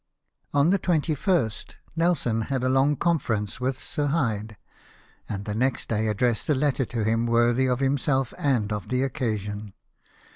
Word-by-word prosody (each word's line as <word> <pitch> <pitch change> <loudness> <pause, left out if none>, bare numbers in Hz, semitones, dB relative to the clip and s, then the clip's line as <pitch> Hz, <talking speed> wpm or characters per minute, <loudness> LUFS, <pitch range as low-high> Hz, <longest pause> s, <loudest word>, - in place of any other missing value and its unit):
On 145 +4 +3
the 195 - +3
21st 155 - 0 0.2
Nelson 160 -10 +1
had 135 -2 -1
a 130 - +2
long 135 +3 +3
conference 125 -11 -1
with 130 0 -1
Sir 145 +2 -2
Hyde, 110 -8 -1 0.7
and 100 0 -4
the 105 - -3
next 125 +4 -1
day 110 0 0
addressed 110 +3 0
a 150 - +4
letter 135 -1 +1
to 115 -1 -3
him 115 +2 +1
worthy 120 +2 +3
of 125 +1 0
himself 135 -1 +1
and 115 -7 +1
of 105 -1 -5
the 130 0 +1
occasion. 105 -7 -3
125 Hz, 155 wpm, -25 LUFS, 110-140 Hz, 0.7 s, a